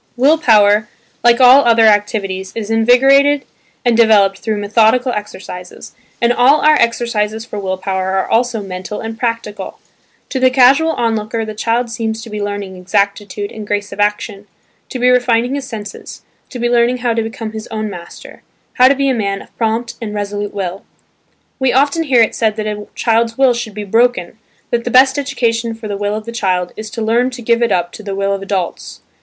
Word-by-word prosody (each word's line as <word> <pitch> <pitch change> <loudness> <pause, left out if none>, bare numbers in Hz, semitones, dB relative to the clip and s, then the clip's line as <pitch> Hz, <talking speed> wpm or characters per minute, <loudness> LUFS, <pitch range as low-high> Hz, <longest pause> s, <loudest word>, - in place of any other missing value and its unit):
Will 290 +6 +4
power, 210 -5 +4 0.3
like 240 0 +4
all 260 +2 +7
other 230 -1 +4
activities 205 -3 0
is 225 -1 -4
invigorated 270 +5 +4 0.4
and 240 -1 +3
developed 205 -4 +4
through 220 -2 -2
methodical 225 +5 +2
exercises, 190 -4 -8 0.3
and 235 0 +2
all 260 +5 +4
our 305 - +5
exercises 225 -4 0
for 210 -3 -6
will 190 -1 -3
power 190 0 -2
are 190 - -1
also 230 -2 0
mental 185 +2 -6
and 225 0 -7
practical. 230 -4 -4 0.5
To 265 - -2
the 255 0 +4
casual 270 +5 +4
onlooker 225 -1 -2
the 215 - -6
child 230 +2 -1
seems 225 -1 -3
to 230 - -10
be 210 0 -4
learning 205 -2 -5
exactitude 200 +2 -2
and 215 -1 -9
grace 205 0 -2
of - - -9
action, 205 0 -2 0.4
to - - -5
be 250 0 +1
refining 245 0 +2
his 280 -2 -4
senses, 210 -5 -9 0.3
to - - -8
be 240 0 -1
learning 240 +1 +2
how 235 - +2
to 225 - 0
become 225 0 -6
his 220 0 -7
own 215 -1 -4
master, 175 -4 -11 0.3
how 255 - +5
to 275 - +3
be 275 0 0
a 265 - +2
man 200 -4 -2
of - - -24
prompt 230 +1 -2
and 210 -2 -5
resolute 205 0 -4
will. 190 -1 -5 0.8
We 265 -2 +1
often 285 +5 +2
hear 250 -5 +4
it 220 - -1
said 220 -2 0
that 215 -1 -4
a 210 -1 -5
child's 230 0 0
will 265 -2 +4
should 235 -3 -6
be 210 - -5
"broken" 225 -2 0 0.3
that 235 -1 0
the 245 - -3
best 260 +3 +4
education 235 -4 -1
for 225 -1 -8
the 205 - -3
will 205 +1 -2
of 215 0 -6
the 230 - -6
child 185 -6 -1
is 215 0 -7
to 225 +1 -5
learn 235 +3 +1
to 245 -2 -9
give 235 +1 +1
it 235 -2 +1
up 175 -2 0
to - - -10
the 200 -2 -5
will 200 0 0
of 195 - -4
adults. 195 -3 -4
225 Hz, 200 wpm, -16 LUFS, 205-245 Hz, 0.8 s, all